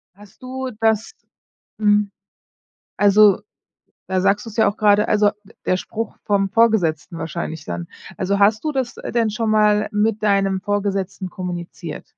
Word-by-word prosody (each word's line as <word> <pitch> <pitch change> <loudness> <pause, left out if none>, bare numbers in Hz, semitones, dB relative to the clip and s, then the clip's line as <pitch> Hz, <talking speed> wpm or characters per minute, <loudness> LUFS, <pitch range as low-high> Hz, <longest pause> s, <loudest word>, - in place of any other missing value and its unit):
Hast 205 +3 -18
du 260 0 -5
das 220 - +1 0.7
mhm. 205 -1 +3 0.9
Also, 205 -1 +5 0.7
da 185 -1 0
sagst 205 +4 +1
du's 225 - -9
ja 220 - +4
auch 205 - -4
grade, 210 0 +4
also, 210 -1 +3
d 220 - -19
der 185 - +2
Spruch 225 +4 -5
vom 195 -1 +1
Vorgesetzten 190 -8 +1
wahrscheinlich 160 -1 -5
dann. 85 -1 -5 0.3
Also, 200 +1 0
hast 215 +6 +3
du 305 - 0
das 255 -3 -2
denn 230 -2 -1
schon 220 +1 -1
mal 210 -1 +3
mit 215 +1 0
deinem 195 -2 +2
Vorgesetzten 200 -2 -2
kommuniziert? 175 -3 -6
205 Hz, 150 wpm, -20 LUFS, 190-220 Hz, 0.9 s, Also